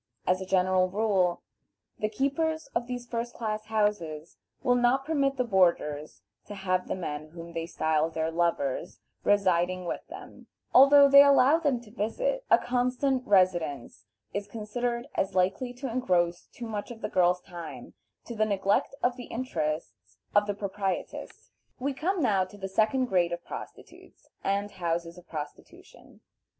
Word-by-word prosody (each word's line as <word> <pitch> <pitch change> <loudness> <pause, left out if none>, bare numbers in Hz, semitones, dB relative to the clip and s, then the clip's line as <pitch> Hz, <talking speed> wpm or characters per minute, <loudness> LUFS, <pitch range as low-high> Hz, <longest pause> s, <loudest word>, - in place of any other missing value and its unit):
As 185 +1 +1
a 190 - -6
general 185 0 +3
rule, 195 -3 +1 0.6
the 215 - 0
keepers 300 +7 -1
of 235 0 -1
these 245 -1 -5
first 240 0 -4
class 215 -2 -3
houses 205 -8 -1 0.3
will 245 - +4
not 245 +2 +2
permit 275 -3 +1
the 250 - +2
boarders 170 -8 +1 0.2
to 205 - -7
have 185 -2 -1
the - - -2
men 155 -4 -5
whom 170 +1 -10
they 165 0 -3
style 160 -1 +1
their 160 0 -2
"lovers" 165 -5 -1 0.3
residing 185 -2 +2
with - - -3
them, - - -11 0.3
although 280 +2 +8
they 280 0 +9
allow 280 +2 +5
them 285 -7 +1
to 220 -3 -16
visit; - - -1
a - - +7
constant 250 +1 0
residence 175 -9 +1 0.3
is 200 0 -3
considered 235 +3 -3
as 190 - -1
likely 190 +7 +1
to 260 +2 -6
engross 180 -8 0
too 240 - -9
much 210 -2 -5
of 235 -2 -9
the - - -2
girl's 180 0 +2
time 175 -3 -9 0.3
to 235 - -6
the 215 -1 +1
neglect 205 +5 +1
of 245 0 +1
the 245 - -7
interest 160 - -3 0.4
of 205 0 +4
the 205 - -1
proprietress. 195 -1 -4 0.3
We 275 +2 -1
come 345 +5 -1
now 200 -6 +3
to 195 +2 -14
the 195 -1 -5
second 220 +6 +2
grade 180 -6 +1
of 175 0 -6
prostitutes - - -11
and 200 +1 -1
houses 170 0 -3
of 175 - -20
prostitution. 150 -2 -10
205 Hz, 160 wpm, -28 LUFS, 175-245 Hz, 0.6 s, they